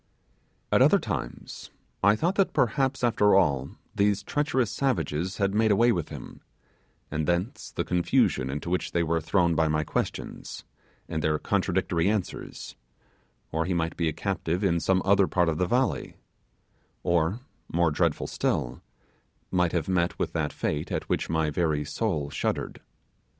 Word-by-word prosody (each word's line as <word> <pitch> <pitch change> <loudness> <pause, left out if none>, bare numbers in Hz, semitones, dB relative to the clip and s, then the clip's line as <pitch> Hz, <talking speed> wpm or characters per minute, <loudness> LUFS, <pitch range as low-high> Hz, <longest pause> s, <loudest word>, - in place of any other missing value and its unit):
At - - +4
other - - +6
times - - -5 0.3
I 100 +2 +5
thought 170 - 0
that 195 -1 +1
perhaps 135 +2 +1
after 105 -4 +4
all 70 -8 +2 0.2
these 100 -1 +1
treacherous 130 -4 0
savages 95 - -1
had 100 -1 +1
made 110 +1 +3
away 115 +4 +4
with 85 -8 -2
him, - - -9 0.7
and 75 0 -1
thence 85 +6 -1
the - - -2
confusion 85 -6 +1
into 75 +5 -4
which 90 - -1
they 85 - +2
were 80 0 0
thrown 85 +1 +2
by 80 0 +2
my 75 0 +1
questions, - - -4 0.4
and 80 -2 -3
their 75 0 +2
contradictory 95 -1 0
answers, 105 -4 -4 0.8
or 80 +1 0
he 90 0 -1
might 80 -1 -1
be 85 - 0
a - - +1
captive 90 +1 -2
in 85 -3 +2
some 95 +2 +1
other 100 -1 +4
part 90 -2 +2
of 80 - -2
the 90 - +2
valley, 125 +5 0 0.9
or, 85 +6 +1 0.3
more 85 -1 +2
dreadful - - 0
still, - - -2 0.7
might 90 -2 +2
have 85 -4 -1
met 90 -2 +1
with - - -2
that - - -1
fate 75 0 -3
at - - -2
which - - -1
my 80 -1 +1
very 75 -2 0
soul 75 -3 -2
shuddered. 70 - -2
90 Hz, 160 wpm, -27 LUFS, 80-100 Hz, 0.9 s, other